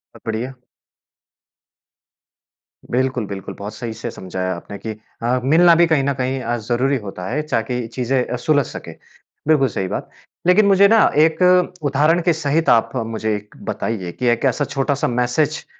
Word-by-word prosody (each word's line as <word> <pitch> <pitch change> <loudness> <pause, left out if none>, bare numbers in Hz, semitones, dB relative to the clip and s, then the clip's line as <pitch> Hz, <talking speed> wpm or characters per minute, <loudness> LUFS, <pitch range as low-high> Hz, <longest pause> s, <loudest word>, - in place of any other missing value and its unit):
सब - - -13
बढ़िया। 115 +4 -3 2.4
बिल्कुल, 130 -2 0
बिल्कुल। 95 -1 -6
बहुत 105 +1 -6
सही 115 0 -5
से 110 - -6
समझाया 95 0 -4
आपने 100 +4 -9
कि 110 - -6 0.3
अ, 125 +2 +1
मिलना 165 +5 +5
भी 170 +1 +5
कहीं 155 -4 +2
न 140 +1 +1
कहीं 130 0 -2
अ, 120 -1 -1
ज़रूरी 125 +5 0
होता 95 -5 -7
है 145 +6 -1
ताकि 120 +1 -1
चीज़ें 125 0 0
अ, - - -3
सुलझ 145 +2 +2
सकें, - - -8 0.5
बिल्कुल 150 -4 +4
सही 95 -6 -3
बात। - - -4 0.4
लेकिन 200 +4 +5
मुझे 200 0 +6
ना 225 +2 +5 0.3
एक 160 +2 -1 0.4
उदाहरण 150 +5 +3
के 170 0 +3
सहित 160 +1 0
आप 115 - +4
मुझे 110 -2 -2
एक 105 0 -9
बताइए 95 -6 -3
कि 125 - -5
एक 120 +2 +1
ऐसा 135 +2 +1
छोटा-सा 140 0 -1
मैसेज 125 +6 0
125 Hz, 165 wpm, -20 LUFS, 115-150 Hz, 2.4 s, मुझे